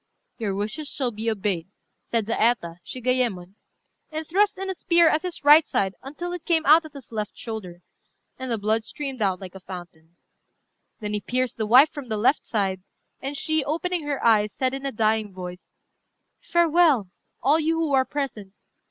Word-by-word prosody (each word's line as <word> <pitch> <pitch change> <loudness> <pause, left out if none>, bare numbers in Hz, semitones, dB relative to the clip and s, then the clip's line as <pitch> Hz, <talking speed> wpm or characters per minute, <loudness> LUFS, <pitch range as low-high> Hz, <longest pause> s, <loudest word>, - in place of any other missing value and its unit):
"Your 205 -4 -1
wishes 215 +10 -3
shall 260 -3 -2
be 220 +1 -2
obeyed," 195 -6 -2 0.4
said 230 -3 -1
the 225 - -2
Eta, 195 -8 +1
Shigayémon, 245 -8 -1 0.6
and 315 +1 -4
thrust 400 +6 +2
in 385 +1 -4
a 380 - -1
spear 340 -2 +4
at 310 0 +3
his 360 -4 -5
right 300 +2 +8
side 195 -1 0
until 345 +6 -6
it 355 - -6
came 325 -2 +1
out 315 +3 +6
at 310 - -11
his 275 -5 -12
left 215 -2 -4
shoulder, 185 -7 -7 0.6
and 260 0 -5
the 230 - 0
blood 215 +2 +1
streamed 270 +1 -6
out 190 -3 +1
like 185 -2 -9
a 190 - -10
fountain. 175 -3 -11 0.9
Then 210 0 -3
he 210 - -1
pierced 255 +1 -1
the 220 -2 -1
wife 265 +8 +7
from 285 -5 -8
the 215 - -1
left 245 +7 +2
side; 195 -4 -1 0.4
and 280 +1 -4
she, 315 +1 0
opening 335 +4 -1
her 285 -2 -2
eyes, 210 -2 +4
said 260 +4 -1
in 270 +1 -4
a - - -2
dying 220 -2 +1
voice 180 0 -9 0.6
"Farewell, 330 - +3 0.3
all 290 +5 +4
you 325 +1 +1
who 320 -3 0
are 265 -1 +5
present. 245 -9 -5
245 Hz, 185 wpm, -24 LUFS, 210-305 Hz, 0.9 s, right